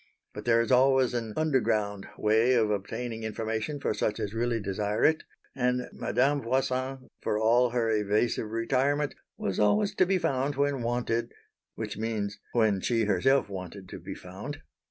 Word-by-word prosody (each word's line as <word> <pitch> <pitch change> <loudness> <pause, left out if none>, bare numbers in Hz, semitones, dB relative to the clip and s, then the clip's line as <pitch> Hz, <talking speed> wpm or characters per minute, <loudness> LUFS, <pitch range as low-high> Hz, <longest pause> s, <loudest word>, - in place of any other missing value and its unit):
But - - -8
there 115 -1 +4
is 115 - -2
always 130 0 +4
an 115 -2 -2
"underground" 110 -10 +1
way 110 +4 +3
of 110 -3 +3
obtaining 115 +3 -3
information 110 +5 -3
for 135 - 0
such 105 +1 -1
as 105 -1 -3
really 115 0 0
desire 105 +1 -1
it; 155 0 +3 0.3
and 125 -1 0
Madame 140 +3 +1
Voisin, 130 +1 -1
for 105 - 0
all 120 +3 +4
her 120 -1 0
evasive 105 +1 +1
retirement, 135 +6 +1 0.2
was 95 - -2
always 200 - +3
to 185 -2 +3
be 190 0 +3
found 140 -3 0
when 140 -1 +1
wanted 120 0 -1 0.4
which - - -5
means 110 -2 -2
when 110 -5 +3
she 115 +1 +1
herself 120 +6 +3
wanted 95 0 -7
to - - -7
be - - -7
found. 100 +11 -8
115 Hz, 160 wpm, -28 LUFS, 105-130 Hz, 0.4 s, there